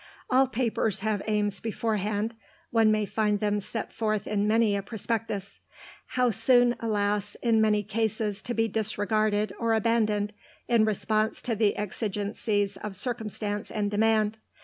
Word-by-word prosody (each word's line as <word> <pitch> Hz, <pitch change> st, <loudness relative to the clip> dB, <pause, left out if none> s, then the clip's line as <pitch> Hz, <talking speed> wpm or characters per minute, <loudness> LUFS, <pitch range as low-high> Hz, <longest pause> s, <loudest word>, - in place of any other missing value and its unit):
All 260 Hz, +1 st, +5 dB
papers 225 Hz, -5 st, 0 dB
have 215 Hz, -1 st, 0 dB
aims 205 Hz, -2 st, +1 dB
beforehand 215 Hz, -1 st, -1 dB, 0.4 s
(one 225 Hz, -2 st, +4 dB
may 215 Hz, -1 st, +1 dB
find 210 Hz, 0 st, 0 dB
them 210 Hz, 0 st, +1 dB
set 215 Hz, +2 st, -5 dB
forth 215 Hz, -2 st, -1 dB
in 205 Hz, 0 st, 0 dB
many 220 Hz, -1 st, +3 dB
a 200 Hz, -, -1 dB
prospectus); 210 Hz, -1 st, -3 dB, 0.6 s
how 250 Hz, -1 st, +3 dB
soon, 245 Hz, +3 st, +4 dB
alas, 205 Hz, -2 st, -1 dB
in 225 Hz, -2 st, +4 dB
many 210 Hz, -1 st, +3 dB
cases 215 Hz, -1 st, -1 dB
to 240 Hz, -, -3 dB
be 225 Hz, 0 st, +2 dB
disregarded 215 Hz, -1 st, 0 dB
or 230 Hz, -1 st, +2 dB
abandoned 215 Hz, -2 st, +1 dB, 0.3 s
in 230 Hz, -3 st, +4 dB
response 215 Hz, +1 st, 0 dB
to 235 Hz, -3 st, -1 dB
the 210 Hz, -1 st, +2 dB
exigencies 205 Hz, 0 st, -2 dB
of 205 Hz, 0 st, -6 dB
circumstance 210 Hz, -2 st, -3 dB
and 205 Hz, -2 st, -1 dB
demand. 215 Hz, 0 st, +2 dB
215 Hz, 145 wpm, -27 LUFS, 205-225 Hz, 0.6 s, All